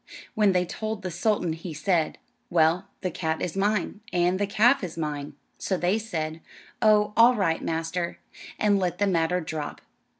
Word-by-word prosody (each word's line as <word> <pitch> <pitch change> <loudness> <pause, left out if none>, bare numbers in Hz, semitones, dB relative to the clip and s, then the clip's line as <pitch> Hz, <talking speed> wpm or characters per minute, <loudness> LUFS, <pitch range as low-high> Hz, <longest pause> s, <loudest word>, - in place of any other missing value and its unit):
When 210 -2 +4
they 180 0 +2
told 215 +3 -5
the 185 - -3
sultan 180 -1 0
he 165 0 -7
said, 165 0 0 0.3
"Well, 170 +3 +3
the 185 - -2
cat 160 -2 -2
is 175 - -3
mine, 205 +1 0
and 180 +1 +2
the 205 - +1
calf 235 +5 +4
is 175 -2 -5
mine." 150 -2 -4 0.3
So 190 - -1
they 180 +5 +1
said, 160 -7 -4 0.4
"Oh, 210 -1 +4
all 235 +3 +7
right, 165 -6 +1
master," 165 +2 -2 0.4
and 205 -2 +3
let 180 -2 -1
the 205 - +2
matter 180 -1 +1
drop. 155 -2 -5
180 Hz, 170 wpm, -26 LUFS, 165-205 Hz, 0.4 s, all